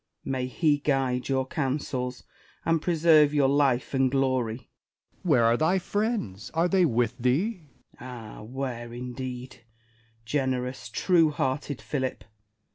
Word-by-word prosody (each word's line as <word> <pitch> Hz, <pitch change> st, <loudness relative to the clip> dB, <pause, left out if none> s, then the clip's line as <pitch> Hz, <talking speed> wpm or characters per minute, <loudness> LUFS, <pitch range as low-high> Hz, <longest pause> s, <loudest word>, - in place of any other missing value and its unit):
May 130 Hz, -1 st, -1 dB
He 145 Hz, +2 st, +2 dB
guide 135 Hz, -3 st, 0 dB
your 130 Hz, -1 st, +1 dB
counsels, 130 Hz, -3 st, -3 dB, 0.4 s
and 165 Hz, -1 st, +2 dB
preserve 155 Hz, -3 st, +4 dB
your 140 Hz, -2 st, +4 dB
life 140 Hz, -3 st, +2 dB
and 135 Hz, -1 st, +3 dB
glory! 130 Hz, -4 st, +1 dB
Essex. -, -, -31 dB, 0.5 s
Where 150 Hz, -10 st, +3 dB
are 115 Hz, +1 st, +4 dB
thy 165 Hz, +7 st, +2 dB
friends 190 Hz, -, -2 dB
% -, -, -26 dB
Are 165 Hz, +2 st, +3 dB
they 185 Hz, -1 st, +4 dB
with 120 Hz, -2 st, 0 dB
thee? 160 Hz, -, 0 dB, 0.3 s
Spenser. -, -, -25 dB
Ah, 120 Hz, -4 st, -9 dB
where, 120 Hz, 0 st, -5 dB
indeed! 125 Hz, 0 st, -6 dB, 0.6 s
Generous, 125 Hz, -1 st, -2 dB
true 165 Hz, -, +3 dB
hearted 140 Hz, -1 st, -2 dB
Philip 130 Hz, -3 st, -3 dB
130 Hz, 135 wpm, -27 LUFS, 125-150 Hz, 0.6 s, preserve